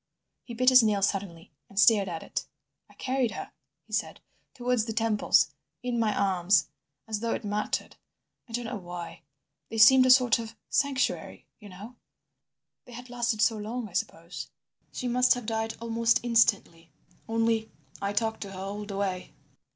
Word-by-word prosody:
He 235 - -9
bit 255 +2 +5
his 255 -1 +8
nail 210 -3 +1
suddenly, 190 -4 -2 0.2
and 200 - -4
stared 205 -2 +5
at 165 -2 -5
it. - - -5 0.4
"I - - -20
carried 260 -2 0
her," - - -7 0.3
he - - -16
said, - - -2 0.4
"towards 245 -3 0
the 225 - -4
temples, 220 -1 +2 0.3
in 245 -1 -1
my 220 -2 +2
arms—as 190 0 -1
though 230 +1 -1
it - - -7
mattered. 210 +1 -3 0.5
I - - -12
don't 240 +1 -2
know 230 +1 -4
why. 175 -2 -8 0.5
They 225 - -5
seemed 255 +4 +7
a - - +2
sort 250 -3 +5
of 225 0 -7 0.2
sanctuary, 280 -2 -1
you 210 -2 -12
know, 205 +7 -11 0.9
they 245 - -13
had 245 +1 -10
lasted 235 -3 0
so 225 - +2
long, 220 +2 -5
I - - -19
suppose. 170 0 -4 0.4
"She 250 - -4
must 250 +1 +4
have 245 -2 -6
died 225 0 -2
almost 230 0 +1
instantly. 200 -9 +1 0.4
Only—I 225 -3 -2
talked 220 +2 -1
to 195 -2 -6
her 185 - -8
all 200 +2 -5
the 200 -1 -6
way." 190 -2 -3
225 Hz, 165 wpm, -28 LUFS, 200-240 Hz, 0.9 s, his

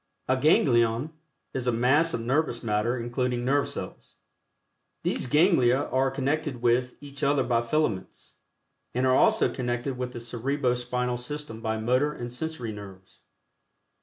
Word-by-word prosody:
(A 130 - +3
ganglion 125 -2 +3 0.4
is 125 -1 -3
a - - +4
mass 135 +8 +3
of 115 - -3
nervous 125 +1 0
matter 110 +3 0
including 120 +1 -2
nerve 140 +2 +2
cells.) - - -8 0.9
These - - 0
ganglia 150 -4 +4
are 135 +1 +2
connected 135 0 -2
with 125 +1 +2
each 140 -1 -9
other 140 -1 +3
by 120 -1 +1
filaments, 115 -6 -2 0.6
and 125 +1 +1
are 130 0 +4
also 220 +4 +4
connected 125 +1 -3
with 125 0 -3
the - - -6
Cerebro 125 +3 -1
Spinal 125 0 -2
System 125 -2 -6
by 110 -1 -1
motor 130 +7 +1
and 120 -2 -7
sensory 125 -4 -4
nerves. 95 -3 -12
125 Hz, 145 wpm, -27 LUFS, 120-140 Hz, 0.9 s, a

